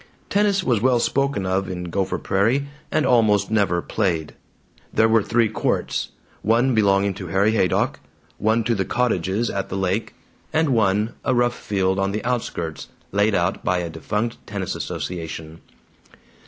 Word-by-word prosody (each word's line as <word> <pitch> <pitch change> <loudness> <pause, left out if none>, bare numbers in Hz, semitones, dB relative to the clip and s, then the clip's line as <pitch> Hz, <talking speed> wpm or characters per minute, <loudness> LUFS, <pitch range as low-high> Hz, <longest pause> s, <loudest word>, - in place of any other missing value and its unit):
Tennis 200 -1 +2
was 120 - +1
well 125 0 +3
spoken 135 -5 0
of 95 +1 0
in 90 -1 -4
Gopher 95 0 -1
Prairie 115 +9 +1 0.2
and 155 - +2
almost 105 -4 +3
never 100 -5 +2
played. 85 -8 -1 0.6
There 110 - +4
were 115 0 +4
three 115 +2 +2
courts: 110 - -1 0.3
one 120 +4 +3
belonging 100 -2 +3
to 95 -1 -7
Harry 95 +5 +2
Haydock, 95 -5 +1 0.4
one 110 +2 +2
to 115 - +1
the 100 -4 0
cottages 110 -2 0
at 100 0 -3
the 95 - -3
lake, 95 +3 -1 0.4
and 160 -1 +2
one, 110 -1 +2
a 130 - +1
rough 120 0 +2
field 95 -1 0
on 100 0 0
the 105 - -3
outskirts, 85 - -3 0.2
laid 105 +1 +2
out 85 +2 0
by 90 - +1
a 85 -2 -3
defunct 105 +8 -2
tennis - - -3
association. 80 -2 -5
105 Hz, 155 wpm, -22 LUFS, 95-115 Hz, 0.6 s, There